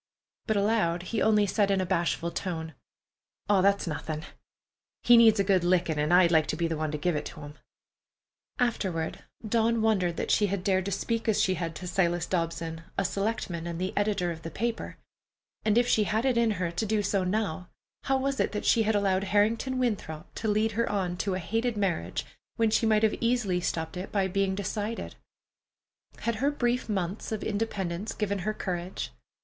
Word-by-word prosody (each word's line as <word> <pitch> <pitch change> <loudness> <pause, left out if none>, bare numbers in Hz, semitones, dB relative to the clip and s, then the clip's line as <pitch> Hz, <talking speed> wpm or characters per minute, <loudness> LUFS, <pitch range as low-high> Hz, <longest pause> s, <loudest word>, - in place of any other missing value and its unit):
But 220 -2 +1
aloud 200 -5 +1
he 215 +4 -2
only 210 -1 +4
said 205 +1 +1
in 195 -1 +2
a 185 - 0
bashful 170 0 0
tone: 160 -4 -4 0.8
"Aw, 200 -2 +5
that's 200 +1 +3
nothin'. 155 -1 -4 0.8
He 240 - +7
needs 225 -2 +7
a - - +4
good 190 -2 +2
lickin', 175 -3 +2
an' 150 +2 +1
I'd 175 -1 +6
like 160 -2 +4
to - - -1
be 170 +1 0
the 165 - -2
one 155 0 -2
to 150 - -2
give 170 +3 0
it 150 - -2
to 155 - -8
him." 145 0 -9 1.0
Afterward, 190 - -1 0.3
Dawn 230 +1 +2
wondered 185 -6 +1
that - - -1
she 205 - +4
had 195 -1 -2
dared 190 -2 +1
to 200 - -2
speak 230 +4 -2
as 215 - +2
she 185 - +3
had 165 -2 -4
to 185 - -7
Silas 175 -2 +1
Dobson, 165 -2 -2 0.2
a 195 - +1
selectman, 195 -4 -2
and 170 -1 -4
the 185 +1 -2
editor 205 -4 +1
of 160 -1 -7
the 165 - -6
paper. 230 +7 -3 0.7
And 215 +1 +2
if 240 0 +4
she 215 -3 +3
had 220 +5 0
it 260 -2 +2
in 235 -1 +3
her 175 -2 -1
to 175 +6 -2
do 215 0 +1
so 195 -1 +1
now, 185 -3 -2 0.4
how 270 -1 +2
was 270 0 -1
it - - +1
that 210 - -3
she 230 - +4
had 220 0 +1
allowed 195 -1 +1
Harrington 220 +6 +1
Winthrop 200 -10 -2
to 225 - -4
lead 215 +1 +2
her 230 +2 0
on 185 -4 -1
to 190 +1 -1
a - - -2
hated 225 +6 -1
marriage, 180 - -1 0.3
when 225 -1 +2
she 225 +1 +2
might 215 0 +3
have 220 - +4
easily 230 -7 +1
stopped 160 -1 -2
it 180 +2 -6
by 195 -2 +1
being 195 0 0
decided? 210 +3 -3 1.1
Had 230 -1 -1
her 275 +5 +2
brief 245 -4 -1
months 195 0 -2
of 215 -1 -3
independence 205 -3 -2
given 200 -2 -2
her 215 +4 -1
courage? 175 - -4
195 Hz, 200 wpm, -28 LUFS, 175-220 Hz, 1.1 s, He